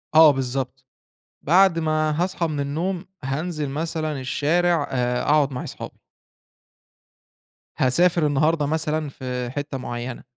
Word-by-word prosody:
آه 160 -1 +9
بالضبط، 130 0 -3 0.6
بعد 180 +2 +4
ما 155 -1 +1
هاصحى 180 -2 -1
من 150 -2 -3
النوم 170 +6 -2 0.2
هانزل 150 +2 -3
مثلًا 155 0 -3
الشارع، 160 +5 +1
آآ 125 -1 0
أقعد 145 -1 +3
مع 125 - -4
أصحابي. - - -8 1.8
هاسافر 170 +6 +3
النهارده 150 +2 +2
مثلًا، 155 0 -1
في 125 -2 -5
حتة 145 +1 -4
معينة. 120 -1 -6
150 Hz, 115 wpm, -23 LUFS, 135-160 Hz, 1.8 s, آه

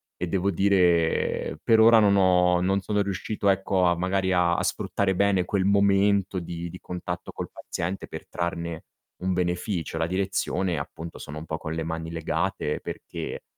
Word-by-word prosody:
E 90 - -3
devo 95 +2 0
dire, 90 -3 +2
per 115 -1 +4
ora 115 0 +8
non 100 -2 +4
ho 90 -2 +4
non 95 +2 +2
sono 105 +1 0
riuscito, 100 +1 -1
ecco, 95 -1 +1
a 85 -1 +2
magari 95 +1 0
a 90 -1 +2
sfruttare 95 -2 0
bene 100 -1 +2
quel 95 +1 0
momento 100 -1 +3
di 85 0 -6
di 90 +2 -10
contatto 90 -1 -6
col - - -6
paziente 90 +3 -5
per - - -9
trarne 85 -1 -4 0.4
un 95 0 +1
beneficio. 90 -1 -2
La 80 0 0
direzione, 95 -1 -1
appunto, 80 0 -7
sono 75 - -7
un 80 - -9
po' 80 -1 -3
con 80 0 -5
le 80 0 -2
mani 80 0 -4
legate 80 -2 -2
perché, - - -6
90 Hz, 170 wpm, -26 LUFS, 85-100 Hz, 0.4 s, ora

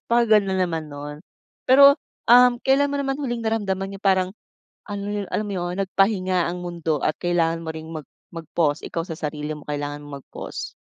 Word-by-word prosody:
Napakaganda 220 -4 +3
naman 165 -3 -1
no'n. 145 +1 -7 0.5
Pero, 280 +2 +8 0.3
um, 245 0 +7
kailan 275 +1 +4
mo - - 0
naman 270 -1 -1
huling 240 -4 -2
naramdaman 195 -3 -1
yung - - -16
parang 190 -2 +3 0.6
ano, 205 0 -3
alam 215 - -1
mo - - -5
'yon, 175 +1 -3
nagpahinga 185 -2 +1
ang 180 - -5
mundo 165 -3 -2
at 155 - +1
kailangan 170 -2 +1
mo 160 - -5
ring 160 0 -8
mag 155 -2 -6 0.3
mag-pause. 160 -2 -1
Ikaw 165 - -3
sa 165 - -5
sarili 150 -1 -4
mo, 150 - -11
kailangan 145 0 -3
mong 145 -1 -8
mag-pause? - - -7
185 Hz, 175 wpm, -23 LUFS, 160-215 Hz, 0.6 s, Pero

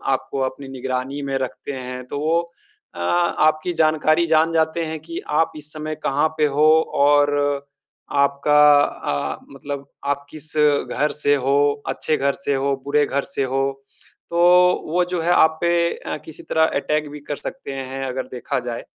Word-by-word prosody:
आपको 135 +1 -5
अपनी 135 +1 -12
निगरानी 130 +1 -4
में 135 - 0
रखते 130 +2 -5
हैं, 125 -1 -6
तो 145 - -4
वो 160 +3 +2 0.5
अ, - - -8
आपकी 155 -1 +1
जानकारी 155 +1 +2
जान 160 +1 +3
जाते 160 +1 +1
हैं 160 0 -5
कि 165 +2 -7 0.2
आप 165 - 0
इस 150 0 -12
समय 155 0 -5
कहाँ 145 +3 +2
पे 150 - +3
हो 150 - +5 0.4
और 145 0 +4 0.8
आपका 140 +1 +3 0.2
अ, 70 - -3
मतलब 140 0 -7 0.2
आप 140 0 -1
किस 155 +1 -7 0.4
घर 150 +1 0
से 145 -1 +3
हो, 145 +2 +1
अच्छे 155 - 0
घर 140 0 +1
से 140 - +1
हो, 140 +1 0
बुरे 145 +1 +2
घर 140 +1 -1
से 140 0 -2
हो, 135 +1 0 0.7
तो 170 - 0 0.5
वो 175 +3 +2
जो 180 -1 -2
है, 170 +2 +1
आप 160 -2 +4
पे 170 0 +2
अ, - - -5
किसी 160 - -10
तरह 160 - +1 0.2
अटैक 150 0 -1
भी 150 +1 -9
कर 145 - -1
सकते 205 - -7
हैं, 135 0 -5
अगर 130 0 -4
देखा 130 +2 -3
जाए। 115 - -5
145 Hz, 175 wpm, -21 LUFS, 135-155 Hz, 0.8 s, हो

